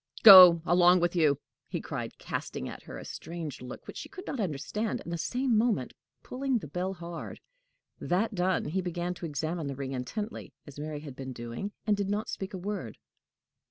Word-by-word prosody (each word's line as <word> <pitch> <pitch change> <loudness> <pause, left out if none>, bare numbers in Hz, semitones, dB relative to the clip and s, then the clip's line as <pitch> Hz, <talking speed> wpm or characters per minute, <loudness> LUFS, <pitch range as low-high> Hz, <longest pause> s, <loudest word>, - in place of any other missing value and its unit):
"Go 180 -5 +11
along 180 +1 +5
with 175 +1 0
you!" 150 -5 +3 0.3
he - - -3
cried, - - -5
casting 65 - -5
at - - -8
her - - -9
a - - -9
strange 165 -6 -7
look 125 - -9
which - - -9
she - - -7
could 385 -1 -10
not 270 - -4
understand, 195 +5 -2
and 170 - -6
the - - -1
same 250 +3 0
moment 215 - +1 0.3
pulling 265 0 -1
the 180 - -6
bell 180 +6 -3
hard. 170 -1 -7 0.6
That 205 +6 0
done, 185 -1 +1
he 180 +6 -1
began 175 0 -3
to 175 -1 -6
examine 155 +1 -3
the 140 - -4
ring 135 0 -5
intently, 205 - -5
as 145 -1 -11
Mary 150 -1 -5
had 145 -4 -9
been 130 -1 -6
doing, 120 - -5
and 210 -1 +3
did 200 -1 -2
not 210 +2 -2
speak 195 0 -5
a - - -4
word. 185 - -5
175 Hz, 195 wpm, -29 LUFS, 150-205 Hz, 0.6 s, Go